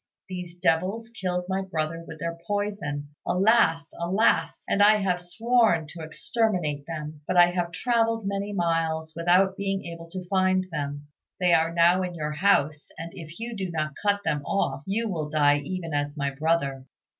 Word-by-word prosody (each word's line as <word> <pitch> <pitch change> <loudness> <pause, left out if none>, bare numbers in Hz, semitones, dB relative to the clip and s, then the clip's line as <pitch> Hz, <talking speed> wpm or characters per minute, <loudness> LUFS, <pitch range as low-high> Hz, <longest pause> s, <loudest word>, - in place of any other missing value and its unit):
These 180 -2 -7
devils 190 +8 0
killed 180 -6 -2
my 190 +1 -1
brother 165 -3 -3
with - - -8
their 170 0 -3
poison, 200 -9 -2
alas! 180 -5 +3
alas! 185 +6 +1
and 200 - +1
I 210 +1 +7
have 185 -4 0
sworn 220 -2 +2
to 170 - -8
exterminate 160 -4 -1
them; 155 -2 -6
but 185 - 0
I 175 0 +7
have 175 -1 -2
travelled 230 +1 +1
many 200 +1 -2
miles 165 -3 -1
without 180 +3 +3
being 195 -1 -2
able 170 0 -8
to 185 +1 -6
find 185 -1 +2
them. 145 -1 -4 0.3
They 180 -2 +4
are 165 0 +3
now 170 +2 +4
in 180 -1 -3
your 150 -2 -3
house, 150 -3 +2
and 165 +1 -6
if 165 +1 -10
you 235 0 -5
do 190 -3 -3
not 155 -3 -2
cut 205 -1 +2
them 150 -3 0
off, 195 -5 -1
you 225 +4 0
will 160 -7 -3
die 145 -1 +4
even 165 +2 -5
as 145 +1 -2
my 140 -1 -1
brother." 140 -3 0
175 Hz, 175 wpm, -26 LUFS, 155-195 Hz, 0.3 s, I